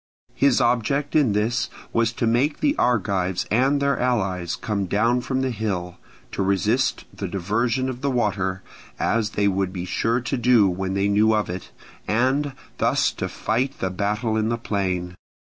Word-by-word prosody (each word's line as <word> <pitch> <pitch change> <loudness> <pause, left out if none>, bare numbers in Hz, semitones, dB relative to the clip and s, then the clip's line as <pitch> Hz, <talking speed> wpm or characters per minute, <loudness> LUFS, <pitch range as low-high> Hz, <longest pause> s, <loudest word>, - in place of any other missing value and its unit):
His 140 -2 +3
object 125 +4 +1
in 140 -9 +4
this 110 +3 0 0.2
was 115 0 +2
to 115 - -1
make 125 +6 +1
the 290 0 +2
Argives 95 -6 +1
and 135 +6 +3
their 140 -1 +1
allies 95 -9 0
come 100 -4 -2
down 115 +6 +2
from 130 +1 -1
the 130 -1 0
hill, 95 -6 -3 0.3
to - - -3
resist 105 +7 +1
the 100 - -4
diversion 115 +8 0
of 130 -1 -5
the 140 - 0
water, 95 -6 -1 0.3
as 110 -2 0
they 100 0 +3
would 95 -1 0
be 90 -2 -5
sure 115 +6 0
to 125 +2 -2
do 120 -4 +5
when 95 +1 -2
they 100 +1 +1
knew 105 +2 +3
of 105 -4 -1
it, 90 +1 -7 0.4
and 130 +6 +1 0.3
thus - - +2
to - - -4
fight 130 +5 -1
the 95 - -2
battle 105 +4 -1
in 110 0 +1
the 115 - 0
plain. 95 -5 -2
110 Hz, 175 wpm, -23 LUFS, 95-125 Hz, 0.4 s, do